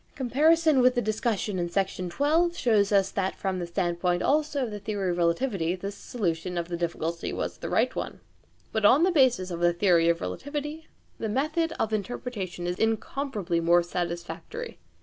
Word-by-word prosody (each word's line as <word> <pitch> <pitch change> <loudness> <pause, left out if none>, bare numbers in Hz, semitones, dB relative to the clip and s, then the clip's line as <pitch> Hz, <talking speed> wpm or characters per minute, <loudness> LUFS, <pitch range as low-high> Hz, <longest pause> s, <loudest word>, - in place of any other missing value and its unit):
Comparison 300 +3 +3
with 250 +1 +4
the 245 - +2
discussion 215 -2 -1
in 175 0 -1
Section 185 -1 -1
11 325 +4 +3
shows 215 -10 +2
that 195 -2 +2
also 190 -1 -1
from 190 -2 -2
the 175 - -4
standpoint 175 0 0
of 305 +1 +2
the 245 -8 -2
theory 200 -4 -1
of 175 - -2
relativity 170 0 +1
this 195 +2 -5
solution 180 -5 -3
of 170 0 -3
the 175 - -2
difficulty 170 -1 -3
was - - -4
the - - -5
right - - +1
one. - - -4 0.5
But 220 - -1
on 265 +10 +6
the 370 - +4
basis 250 - +3
of 170 - -4
the 175 0 +3
theory 170 -2 +3
of 170 - +2
relativity 295 - -5 0.3
the 220 - -2
method 310 +8 0
of 220 - 0
interpretation 205 -5 -4
is 175 +1 -2
incomparably 220 -4 -1
more 170 +1 +4
satisfactory. 175 - -5
200 Hz, 175 wpm, -27 LUFS, 175-260 Hz, 0.5 s, on